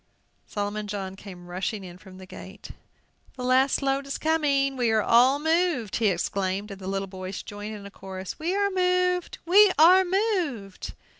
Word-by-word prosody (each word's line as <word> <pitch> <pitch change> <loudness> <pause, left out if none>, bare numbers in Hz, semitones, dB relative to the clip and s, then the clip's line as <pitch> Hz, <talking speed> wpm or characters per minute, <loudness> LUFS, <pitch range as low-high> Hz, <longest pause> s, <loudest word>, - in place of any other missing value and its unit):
Solomon 205 +1 -4
John 195 -2 -5
came 185 -3 -11
rushing 190 +4 -4
in 180 -1 -11
from 185 -1 -14
the 190 - -11
gate. 190 +2 -11 0.6
"The 250 - -7
last 260 +2 +2
load 275 0 0
is 275 - -3
coming! 285 -4 +1
We 245 -3 +1
are 220 -1 +2
all 250 +4 +5
moved!" 320 - 0
he 225 - +2
exclaimed; 195 +2 -2
and 195 0 -9
the 185 - -7
little 195 0 -2
boys 185 0 -7
joined 205 +1 -7
in 200 -1 -10
a 200 - -10
chorus, 190 -1 -8
"We 340 +4 -1
are 400 0 +1
moved! 360 -1 0
we 395 +3 +6
are 360 +4 +7
moved!" 355 - -2
225 Hz, 175 wpm, -25 LUFS, 195-320 Hz, 0.6 s, are